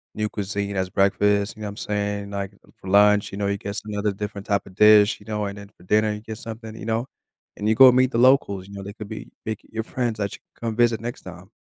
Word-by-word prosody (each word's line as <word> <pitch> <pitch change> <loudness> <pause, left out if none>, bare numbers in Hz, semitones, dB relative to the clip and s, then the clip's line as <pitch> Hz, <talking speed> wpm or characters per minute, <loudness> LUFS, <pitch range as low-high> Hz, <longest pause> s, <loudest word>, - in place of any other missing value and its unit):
new 105 0 -1
cuisine 100 0 -3
as 95 -1 -1
breakfast, 100 +1 +2
you 110 - -12
know - - -3
what - - -4
I'm 105 - -12
saying? 105 -1 -2
Like, 100 -1 -4 0.3
for 95 - -13
lunch, 105 +1 +5
you 100 - -6
know, 100 - 0
you 100 - 0
get 100 0 -6
some 105 0 -5
other 105 0 0
different 105 0 -6
type 100 -2 0
of 95 - -14
dish, 105 0 +6
you 105 - -17
know? 105 -1 -2
And 100 0 -5
then 100 -1 -10
for - - -19
dinner, 105 +3 +2
you 105 - -6
get 110 0 -7
something, 110 -1 -8
you 105 - -8
know? 115 +2 -1 0.5
And 105 - -2
you - - +5
go 130 0 +9
meet 130 +1 +3
the - - -1
locals, 120 -7 +3
you 100 - -12
know? 100 - -7
They 100 +1 -7
could 105 -2 -9
be 110 - -8
make 110 -1 -4
your 110 0 -3
friends 120 -1 -2
that 100 -1 -2
you - - -16 0.2
come 115 -2 -3
visit 120 -2 +2
next 120 +1 -6
time. - - -11
105 Hz, 275 wpm, -23 LUFS, 100-110 Hz, 0.5 s, go